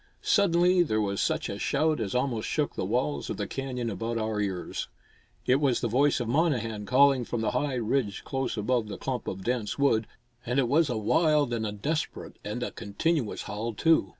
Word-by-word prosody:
Suddenly 180 -2 +4
there 110 -11 +1
was 100 -2 0
such - - 0
a - - -5
shout 155 +2 +1
as 105 -2 -3
almost 125 -4 0
shook - - 0
the - - -3
walls 70 -1 -1
of - - -3
the - - -2
canyon 130 -3 -4
about 115 +4 -3
our 110 -1 -1
ears. 95 -3 -3 0.6
It 130 - +4
was 135 -4 +2
the 120 - 0
voice 135 +6 +3
of 120 - -2
Monnehan 115 -7 0
calling 135 0 +5
from 120 -1 -3
the 110 - 0
high 135 +2 0
ridge 115 -4 -1
close 135 -3 -2
above 115 +1 0
the 105 - -6
clump 130 -2 -3
of 95 0 -4
dense 120 -2 -1
wood; 115 -6 +2 0.4
and 125 +1 -2
it 135 -3 +3
was 150 +4 +3
a 120 - -1
wild 150 +4 +2
and 110 -2 -1
a - - -3
desperate 145 +10 -3
and 105 +4 -4
a - - -3
continuous 115 +5 -1
howl, 110 +2 -4
too. 160 +8 +3
125 Hz, 205 wpm, -28 LUFS, 110-140 Hz, 0.6 s, calling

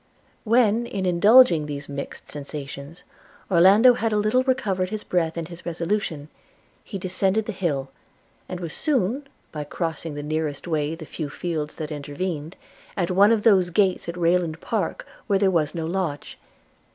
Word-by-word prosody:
When, 230 0 +3
in 195 -4 -3
indulging 180 -2 +6
these 145 0 -6
mixed 140 0 -7
sensations, 145 +2 -8 0.5
Orlando 195 +8 +7
had 230 -2 -1
a 210 - +1
little 215 +5 +2
recovered 205 -9 0
his 215 0 -5
breath 165 -2 -1
and 165 -1 -3
his 170 -1 -11
resolution, 170 -3 -2 0.6
he 200 - -6
descended 190 +3 0
the 220 - -3
hill, 145 -9 -2 0.6
and 180 - -5
was 170 -3 -5
soon, 270 - 0 0.2
by 150 -2 -4
crossing 160 0 -4
the 145 - -5
nearest 155 0 -3
way 155 -1 -1
the 165 -1 -9
few 155 -1 -5
fields 155 -1 -4
that 155 -1 -6
intervened, 150 +3 -4 0.4
at 180 -2 0
one 200 +4 +5
of 220 -2 +2
those 190 -5 +5
gates 185 -1 +1
at 170 - -5
Rayland 170 -2 +1
Park - - -2 0.2
where 200 - +3
there 190 -1 +3
was 160 -2 0
no 165 -1 -2
lodge. 170 -4 -3
175 Hz, 165 wpm, -24 LUFS, 155-205 Hz, 0.6 s, Orlando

